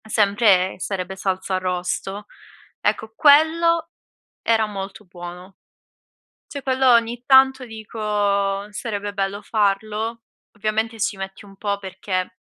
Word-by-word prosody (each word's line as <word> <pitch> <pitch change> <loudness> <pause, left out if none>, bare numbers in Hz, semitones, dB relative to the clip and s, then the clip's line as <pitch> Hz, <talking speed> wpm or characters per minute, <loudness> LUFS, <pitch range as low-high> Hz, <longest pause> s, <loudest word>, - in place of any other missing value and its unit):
Sempre, 200 -3 +3
ehm, - - -11
sarebbe 190 0 -4
salsa 190 0 -2
arrosto. 185 +2 -3 0.5
Ecco, 220 0 -1
quello 320 +4 +4 0.5
era 225 -1 +2
molto 195 0 -7
buono. 180 +1 -10 0.9
Cioè 280 - -7
quello, 265 -1 +2
ogni 235 +1 +2
tanto 265 -1 +5
dico: 220 0 -9 0.7
"Sarebbe 205 -2 -4
bello 200 0 -2
farlo." 215 +2 -1 0.3
Ovviamente 220 +2 -2
ci 210 -1 0
metti 195 +1 -7
un 195 -1 -15
po', 200 0 -2
perché 190 -1 -4
205 Hz, 115 wpm, -22 LUFS, 195-230 Hz, 0.9 s, tanto